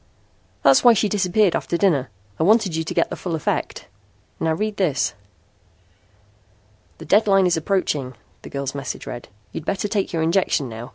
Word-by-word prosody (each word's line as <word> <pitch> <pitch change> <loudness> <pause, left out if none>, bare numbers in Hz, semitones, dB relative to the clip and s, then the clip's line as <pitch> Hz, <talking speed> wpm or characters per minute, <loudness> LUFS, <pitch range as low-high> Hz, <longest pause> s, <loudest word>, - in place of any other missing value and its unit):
"That's 135 -1 +5
why 240 - +8
she 210 - +2
disappeared 200 -1 +2
after 170 - -1
dinner. 150 -10 +1 0.3
I - - +2
wanted 205 -2 +3
you 160 - -1
to 160 - -5
get - - +1
the - - -3
full 175 -3 -4
effect. 155 - -3 0.5
Now 160 -1 +1
read 210 +4 -3
this." 155 -9 0 1.8
"The - - -10
deadline 195 -2 +4
is 180 - +2
approaching," 155 -7 -1 0.3
the - - -10
girl's 140 -1 -4
message 140 -2 -6
read. 120 - -7 0.2
"You'd - - -6
better 195 +4 -2
take 200 -1 -1
your 165 -2 -1
injection 165 -4 +1
now. 115 +1 -8
170 Hz, 170 wpm, -22 LUFS, 145-200 Hz, 1.8 s, why